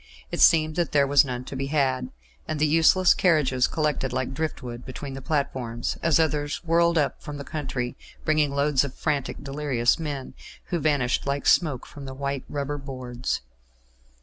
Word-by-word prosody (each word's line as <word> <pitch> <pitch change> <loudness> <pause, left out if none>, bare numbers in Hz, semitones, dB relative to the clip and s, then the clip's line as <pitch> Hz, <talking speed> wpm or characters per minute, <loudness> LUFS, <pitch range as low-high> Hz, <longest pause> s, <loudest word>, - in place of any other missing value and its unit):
It - - -3
seemed 155 -1 +5
that 175 -3 0
there 140 -1 +5
was 140 0 +5
none 125 -2 -4
to 135 - -7
be 135 +1 -2
had, 135 -3 0 0.4
and 155 - -2
the 155 - +4
useless 165 +4 +5
carriages 145 -8 +3
collected 150 -4 -1
like 130 +1 -2
drift 155 -1 -3
wood 120 -1 -7
between 135 +1 -7
the 135 - -7
platforms, 130 -5 -2
as 165 -1 +3
others 150 -2 0
whirled 170 0 +3
up 145 -3 0
from 145 -1 -7
the 140 - -6
country 135 -5 -4 0.3
bringing 155 -2 +3
loads 140 0 +2
of 140 -2 -6
frantic, 140 -3 -2
delirious 135 -4 +1
men, 145 -4 -5 0.4
who 175 - 0
vanished 140 -4 +1
like 140 +1 -1
smoke 150 -8 +3
from 140 -1 -10
the 130 0 -7
white 140 0 -3
rubber 145 0 -3
boards. 130 -3 -4
140 Hz, 175 wpm, -25 LUFS, 130-155 Hz, 0.4 s, seemed